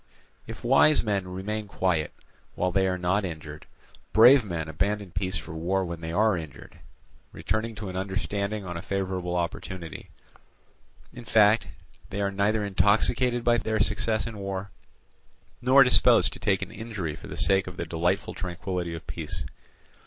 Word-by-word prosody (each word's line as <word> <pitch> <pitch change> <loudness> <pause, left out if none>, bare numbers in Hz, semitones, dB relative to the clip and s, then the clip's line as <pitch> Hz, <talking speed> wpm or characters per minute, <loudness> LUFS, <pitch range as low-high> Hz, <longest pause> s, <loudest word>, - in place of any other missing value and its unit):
If 115 - -9
wise 135 +5 +5
men 100 -4 -1
remain 105 +4 -4
quiet, 90 -6 0 0.4
while 90 - 0
they 95 +1 +2
are 90 -1 0
not 90 +3 +1
injured, 80 -4 -7 0.5
brave 120 +4 +8
men 85 -6 -4
abandon 100 +4 -2
peace 90 +1 -2
for 80 - -8
war 90 +4 -1
when 85 -1 -6
they 80 0 -5
are 105 +3 +3
injured, 80 0 -9 0.5
returning 110 +1 -3
to 105 -2 -6
an 90 - -6
understanding 100 +2 -3
on 90 -1 -5
a 85 - -4
favourable 95 -2 -2
opportunity: 85 0 -5 1.0
in 120 - -9
fact, 110 0 +4 0.4
they 100 - -4
are 100 -1 0
neither 105 +2 +1
intoxicated 110 +6 +2
by 120 0 +3
their 110 0 -1
success 110 +1 +1
in 110 -3 -6
war, 95 0 -4 0.9
nor 130 +2 +7
disposed 125 - +4
to - - -8
take 95 -2 +1
an - - -9
injury 105 -8 -5
for - - -11
the - - -7
sake 95 -1 +2
of 90 -1 -8
the 85 - -3
delightful 85 +4 -1
tranquillity 90 -1 -4
of 80 - -9
peace. - - -6
95 Hz, 160 wpm, -26 LUFS, 90-110 Hz, 1.0 s, brave